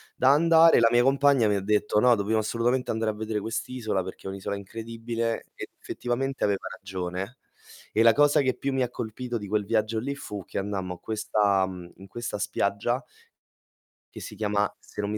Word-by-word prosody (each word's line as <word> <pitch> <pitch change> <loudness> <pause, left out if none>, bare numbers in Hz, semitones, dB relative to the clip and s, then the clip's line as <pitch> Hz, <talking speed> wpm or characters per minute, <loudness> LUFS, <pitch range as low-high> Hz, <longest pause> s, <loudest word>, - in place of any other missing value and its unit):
da 130 - +4
andare. 165 +2 +6
La 115 - +6
mia 120 0 +5
compagna 135 -2 +4
mi 105 - +2
ha - - +1
detto: 105 +1 +1
"No 125 +2 +5
dobbiamo 110 +1 0
assolutamente 120 +4 0
andare 110 -1 0
a - - -8
vedere 110 0 -3
quest'isola 110 -2 -2
perché 95 +1 -9
è - - -2
un'isola 100 +1 -4
incredibile", 115 +3 -4
e - - -7
effettivamente 135 +3 -3
aveva 100 -2 -1
ragione. 95 +3 -5 0.6
E 110 - +4
la 115 -1 +7
cosa 145 +1 +4
che 130 -2 +1
più 140 - -3
mi 130 -1 +1
ha 125 - -2
colpito 120 +1 -4
di 105 -2 -7
quel 105 0 0
viaggio 110 +1 0
lì 140 +5 -3
fu 105 -9 -7
che - - -7
andammo 95 -2 -3
a - - -18
questa, 105 -3 +1
mhmm, 90 -2 -9
in 95 - -13
questa 120 +2 -5
spiaggia 100 +7 -1 1.1
che - - -8
si - - -8
chiama, 105 -1 0
se 105 - -7
non 100 - -2
mi 105 - -2
110 Hz, 200 wpm, -26 LUFS, 100-125 Hz, 1.1 s, la